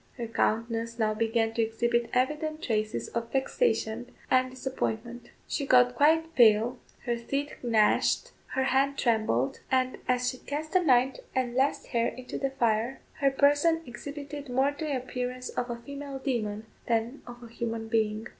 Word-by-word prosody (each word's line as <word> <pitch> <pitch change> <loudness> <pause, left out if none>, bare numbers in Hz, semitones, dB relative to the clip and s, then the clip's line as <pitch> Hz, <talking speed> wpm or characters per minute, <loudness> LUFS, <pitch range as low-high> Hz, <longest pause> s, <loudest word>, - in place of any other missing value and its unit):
Her 240 - -3
countenance 230 +1 -1
now 215 -2 +1
began 225 0 0
to 230 - +1
exhibit 235 +1 0
evident 300 +5 0
traces 215 -2 -1
of 230 0 -4
vexation 250 - 0 0.2
and 255 0 +4
disappointment. 245 -2 -4 0.2
She 280 - -2
got 250 -1 +6
quite 320 +3 +3
pale, 235 0 +5 0.3
her 240 -1 +1
teeth 275 +5 -3
gnashed, 225 -3 +2 0.2
her 265 - +2
hand 275 +1 +2
trembled, 215 - +1
and 255 -1 +1
as 250 0 +1
she 250 0 -2
cast 305 +2 -5
the 370 - +5
ninth 260 -4 +3 0.2
and 255 -2 0
last 270 +3 +1
hair 235 -1 +1
into 255 -1 -6
the 275 - 0
fire, 235 -1 0 0.2
her 275 - +4
person 290 +4 +3
exhibited 285 +3 -7
more 265 +3 +2
the 290 -1 -2
appearance 250 0 -4
of 245 0 -3
a 240 - -2
female 280 +2 -7
demon 220 -6 -2 0.2
than 230 +4 0
of 240 0 -10
a 230 -1 -12
human 230 -1 -3
being. 220 0 0
250 Hz, 160 wpm, -28 LUFS, 230-275 Hz, 0.3 s, got